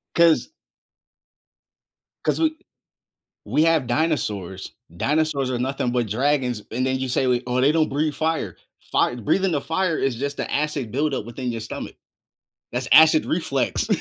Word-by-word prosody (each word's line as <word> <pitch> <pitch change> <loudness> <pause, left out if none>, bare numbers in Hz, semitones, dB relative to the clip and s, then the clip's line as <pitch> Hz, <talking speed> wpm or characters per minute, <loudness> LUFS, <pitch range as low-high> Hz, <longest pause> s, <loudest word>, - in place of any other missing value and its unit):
'Cause 170 - +4 1.8
'Cause - - +1
we 315 -1 +1 0.9
we 155 - +2
have 165 -5 +3
dinosaurs. 110 - -2 0.2
Dinosaurs 145 - 0
are 125 - -1
nothing 130 -1 -1
but 120 -2 0
dragons, 125 -1 0
and 130 +3 -1
then 130 0 0
you 130 0 -3
say, 130 +1 +1
we 125 0 +1
"Oh, 125 +1 0
they 140 +3 +4
don't 160 -1 +2
breathe 150 +2 0
fire." 160 +1 -2 0.3
Fire - - +2
breathing 190 - +1
the 145 - 0
fire 165 +1 -1
is 135 -4 0
just 140 +3 -4
the - - -3
acid 145 -5 -1
buildup 135 -3 -1
within 125 0 -4
your 115 - -4
stomach. 110 - -7 0.8
That's 125 +1 -3
acid 160 0 +7
reflex. 140 -6 -1
135 Hz, 155 wpm, -23 LUFS, 125-155 Hz, 1.8 s, acid